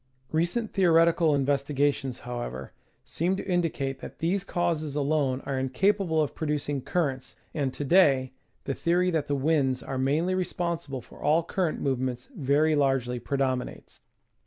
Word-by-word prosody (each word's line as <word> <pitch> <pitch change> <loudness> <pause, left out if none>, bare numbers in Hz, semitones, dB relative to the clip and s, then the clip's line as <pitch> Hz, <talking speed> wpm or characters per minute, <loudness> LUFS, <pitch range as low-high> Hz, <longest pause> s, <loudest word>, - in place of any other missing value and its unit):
Recent 175 +8 0
theoretical 165 -3 +4
investigations, 140 -1 0
however, 120 - -5 0.3
seem 180 +4 -1
to - - -6
in 175 -2 +2
dicate 135 -5 -3
that - - -9
these 180 +4 0
causes 160 -6 -1
alone 140 -3 +1
are 135 -2 -2
incapable 160 +5 +1
of 145 - -4
producing 145 -3 -2
cur 170 +2 +1
rents, 130 -1 -9 0.2
and, 140 -4 -1
to 145 - -5
day, 135 -6 +4 0.3
the 135 - -2
theory 175 +4 +1
that 160 -4 -1
the 145 - 0
winds 135 -3 +1
are 135 - -4
mainly 150 +7 +1
responsi 170 -3 -2
ble 135 -2 -4
for - - -16
all 155 +3 +3
cuj 185 +1 0
rent 155 - -4
movements 130 - -2
very 150 0 +2
largely 135 -4 +1
predominates. 130 0 -3
145 Hz, 160 wpm, -27 LUFS, 135-170 Hz, 0.3 s, theoretical